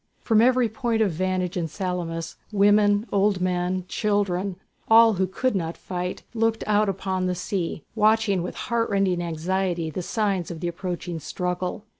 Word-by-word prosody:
From 220 -2 +3
every 250 0 +4
point 225 0 0
of 200 - +1
vantage 185 +1 -1
in 170 -3 -1
Salamis, 170 -2 -4 0.2
women, 205 +1 +4
old 200 -1 +2
men, 180 0 -1
children, 200 -3 0 0.3
all 225 0 +7
who 190 -1 0
could 250 +6 -1
not 165 -3 -2
fight, 180 0 -4
looked 225 -1 0
out 210 0 +2
upon 190 -1 -1
the 180 - -1
sea, 175 -4 -3
watching 215 -3 +3
with 180 - -5
heart 235 -1 -1
rending 195 -3 +1
anxiety 170 0 -1
the 185 - -4
signs 195 -2 -1
of 170 - -6
the 175 - -2
approaching 175 -1 -4
struggle. 180 +4 -3
190 Hz, 160 wpm, -24 LUFS, 180-210 Hz, 0.3 s, all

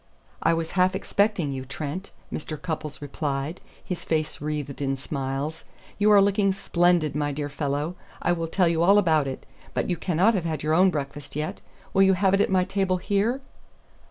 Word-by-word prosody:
"I 165 +1 +3
was 165 0 -3
half 185 +1 +3
expecting 200 -6 +1
you, 130 -1 -4
Trent," 145 +7 -5 0.2
Mr. 155 0 -5
Cupples 155 -4 -5
replied, 145 +2 -3 0.2
his 175 -2 -4
face 155 -2 -1
wreathed 150 -2 -4
in 135 -1 0
smiles. 140 +3 -3 0.4
"You 210 +1 +5
are 200 -1 +7
looking 200 -1 +2
splendid, 175 -4 +2
my 145 -1 0
dear 145 0 -3
fellow. 145 +3 -2 0.3
I - - +1
will 165 -1 -1
tell 180 +2 +2
you 165 -1 +1
all 195 +4 +6
about 160 -7 +3
it. 135 - -6 0.3
But - - 0
you 175 - 0
cannot 180 +6 +2
have 185 -5 -1
had 155 -3 -2
your 155 +1 +1
own 185 +3 +6
breakfast 145 -3 -5
yet. 150 +1 -3 0.3
Will 195 - +4
you 190 0 +6
have 190 +1 +2
it 195 - +4
at - - +2
my 185 -1 +3
table 190 -1 0
here?" 205 +8 0
165 Hz, 190 wpm, -25 LUFS, 145-190 Hz, 0.4 s, are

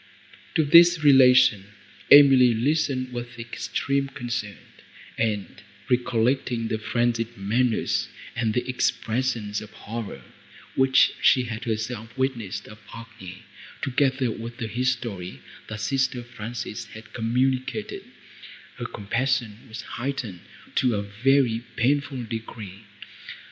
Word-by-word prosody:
To 160 - +3
this 170 +2 +7
relation 125 -7 +6 0.5
Emily 135 -4 +8
listened 130 0 0
with 120 0 -6
extreme 135 +4 -2
concern, 120 -6 -5 0.6
and, 105 -3 -2 0.3
recollecting 120 -1 +1
the 110 - -1
frenzied 120 0 -1
manners 115 +4 0 0.3
and 110 -3 0
the 125 - -1
expressions 120 -3 -1
of 105 - -10
horror, 105 - -7 0.5
which 130 0 +4
she 130 - +5
had 110 -1 -6
herself 115 +1 -4
witnessed 125 -7 -2
of 105 - -12
Agnes, 105 -4 -10 0.4
together 135 -2 +1
with 115 +2 -7
the 115 - -4
history, 115 - -3 0.3
that 110 -1 -6
sister 130 +2 0
Frances 120 -2 -6
had 110 +1 -13
communicated, 125 +3 -1 0.7
her - - -5
compassion 115 +1 -1
was 115 +1 -8
heightened 120 -8 -4 0.3
to 125 -4 +2
a 100 - -1
very 115 +3 +2 0.2
painful 135 +1 0
degree. 110 -3 -7
120 Hz, 110 wpm, -25 LUFS, 110-130 Hz, 0.7 s, Emily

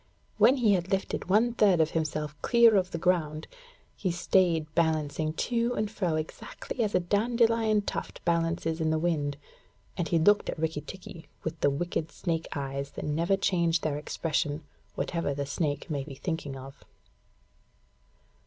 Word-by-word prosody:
When 260 - +7
he 225 -5 +4
had 180 -1 0
lifted 195 -2 -2
one 225 +5 +4
third 200 -7 +4
of 160 0 +3
himself 155 -2 -2
clear 235 -2 +6
of 185 -2 +2
the 170 - -4
ground, 160 -3 0 0.5
he 190 - -2
stayed 175 -2 +2
balancing 155 -1 +1
to 235 +6 0
and 210 0 -1
fro 180 -7 -1
exactly 155 +9 -4
as 210 -3 -1
a - - +5
dandelion 225 +2 +2
tuft - - -5
balances 165 -1 0
in 160 - +1
the 160 - +2
wind, 155 -4 0 0.6
and 170 - -1
he 170 - +2
looked 205 +6 +4
at - - -3
Rikki 160 -1 -1
tikki 175 -2 -10 0.2
with 160 0 -4
the - - +3
wicked 160 +2 -2
snake's 165 -2 -3
eyes 140 0 -3
that - - -5
never 165 +6 +1
change 170 -3 +1
their 150 -2 -1
expression, 150 0 -2 0.3
whatever 165 -5 -2
the 140 0 -2
snake 145 0 -2
may 145 -4 -2
be 140 -1 -9
thinking 150 -3 -4
of. 135 +1 -11
165 Hz, 160 wpm, -28 LUFS, 155-195 Hz, 0.6 s, When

